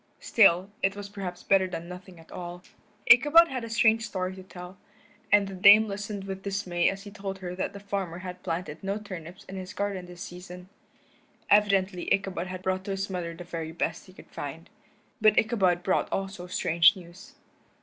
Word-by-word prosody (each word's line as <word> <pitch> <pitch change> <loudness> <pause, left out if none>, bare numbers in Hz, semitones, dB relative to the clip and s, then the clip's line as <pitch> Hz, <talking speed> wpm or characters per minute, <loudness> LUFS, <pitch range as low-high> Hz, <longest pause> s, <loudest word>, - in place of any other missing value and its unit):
Still, 195 -3 +4
it 195 +1 +1
was 205 0 -7
perhaps 185 -3 -6
better 195 -1 +3
than 170 -2 -6
nothing 180 -1 -11
at 165 - -17
all. 175 0 -7 0.4
Ichabod 295 +7 +7
had 255 -3 -4
a 230 - -6
strange 225 0 +3
story 185 -3 -3
to 190 - -10
tell, 180 0 -11 0.5
and 205 -1 +5
the 195 - -7
Dame 205 +4 +7
listened 205 0 -5
with 195 -1 -6
dismay 190 -3 0
as 195 0 -6
he 205 - -10
told 195 -2 -6
her 180 -2 -6
that 185 - -3
the 200 - -8
farmer 195 -4 -4
had 180 0 -8
planted 180 +2 -4
no 195 +1 -1
turnips 185 -4 -9
in 195 - -9
his 185 +1 -8
garden 200 -3 -3
this 175 +1 -9
season. 180 +1 -10 0.8
Evidently 195 -3 +3
Ichabod 195 -2 0
had 185 0 -7
brought 185 0 -1
to - - -6
his 195 0 -3
mother 170 -2 -4
the 175 - -9
very 165 -2 -5
best 165 +1 -3
he 185 - -15
could - - -16
find. - - -7 0.5
But 215 -1 +5
Ichabod 195 -6 +2
brought 185 - 0
also 195 -2 -4
strange 170 +1 +4
news. 185 +9 -13
190 Hz, 190 wpm, -27 LUFS, 180-200 Hz, 0.8 s, Ichabod